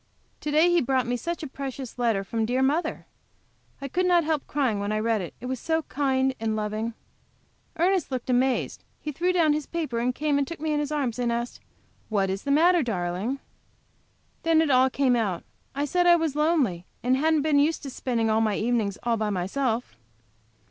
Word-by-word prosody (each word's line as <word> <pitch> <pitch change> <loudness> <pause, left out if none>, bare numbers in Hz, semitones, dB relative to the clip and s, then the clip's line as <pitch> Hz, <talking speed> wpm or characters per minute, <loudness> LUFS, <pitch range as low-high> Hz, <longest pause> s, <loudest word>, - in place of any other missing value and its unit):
To 300 - -4
day 310 +3 +4
he 345 -1 +4
brought 260 -1 +1
me 245 +1 -1
such 335 +6 -4
a - - -3
precious 265 -2 -7
letter 225 -5 +1
from 225 +3 -2
dear 250 +4 +1
mother! 300 +6 0 0.7
I 275 - -5
could 360 +6 0
not 350 -1 +4
help 310 -2 -1
crying 260 -8 0
when 200 +1 -2
I 215 - 0
read 225 -1 +1
it, 175 - -7
it 245 - -9
was 255 -1 -3
so 320 +3 0
kind 265 -2 0
and 220 -1 -1
so - - -1
loving. 215 +2 -3 0.8
Ernest 360 0 +2
looked 255 -3 -4
amazed; 255 0 +1 0.2
he 305 - -4
threw 350 +6 0
down 330 -4 +3
his 300 -1 -3
paper, 250 -8 -1
came 290 +2 0
and 280 - 0
took 335 - -7
me 310 0 -1
in 295 - +1
his 295 0 -2
arms 265 -6 -1
and 240 -1 +1
asked, 235 +1 -3 0.5
"What 195 -3 +1
is 195 +1 -5
the - - -2
matter, 335 +5 +5
darling?" 200 +1 -2 1.0
Then 330 -1 +3
it 320 -3 +2
all 260 0 +5
came 260 -1 +2
out. 200 -7 -1 0.3
I 285 +1 0
said 355 +3 +2
I 345 - +8
was 325 -4 -1
lonely, 290 - +1 0.2
and 250 +1 +3
hadn't 310 +2 +2
been 300 -2 +3
used 310 +3 +1
to 275 - -6
spending 240 -3 -1
my 220 -1 +2
evenings 220 -3 0
all 235 -1 +1
by 215 -1 -1
myself. 220 - -1
260 Hz, 205 wpm, -26 LUFS, 225-305 Hz, 1.0 s, I